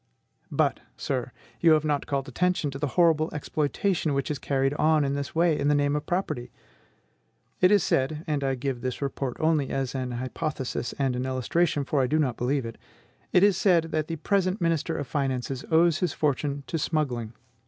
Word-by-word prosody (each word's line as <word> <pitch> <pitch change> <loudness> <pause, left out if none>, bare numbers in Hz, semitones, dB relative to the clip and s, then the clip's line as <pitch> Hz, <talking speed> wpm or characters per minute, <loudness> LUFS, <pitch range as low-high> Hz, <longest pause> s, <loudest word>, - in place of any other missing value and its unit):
But, - - +1 0.2
sir, - - -2 0.3
you 165 -2 +6
have 155 0 +2
not 145 -2 0
called 135 -1 -2
attention 165 +2 0
to 135 - -7
the 145 - 0
horrible 165 -2 +4
exploitation 155 +2 -1
which 140 +2 -1
is 145 - -3
carried 135 0 0
on 155 0 +3
in 140 - -1
this 140 +2 -4
way 165 -1 +3
in 140 - 0
the 145 - +4
name 145 0 +2
of 150 - -3
property. 155 -9 -2 1.1
It 180 - +5
is 205 -1 +4
said, 150 +4 0
and 150 -3 -1
I 135 -1 +1
give 130 -1 -3
this 130 -1 -3
report 135 -2 -3
only 155 -4 +2
as 135 -2 -2
an 130 -2 -3
hypothesis 130 0 -3
and 135 -3 0
an 125 +1 -2
illustration, 145 +4 0
for 140 0 +1
I 130 - +2
do 155 - +1
not 135 -6 +1
believe 130 +1 -1
it, 115 - -8 0.5
it 180 - +5
is 200 -3 +5
said 170 -5 +3
that 155 -1 -1
the 165 - -3
present 190 +3 0
minister 165 -3 0
of 145 - -3
finances 130 -1 -2
owes 165 -1 +4
his 180 - 0
fortune 145 -1 -1
to 165 - -3
smuggling. 125 -8 -1
145 Hz, 195 wpm, -26 LUFS, 135-160 Hz, 1.1 s, you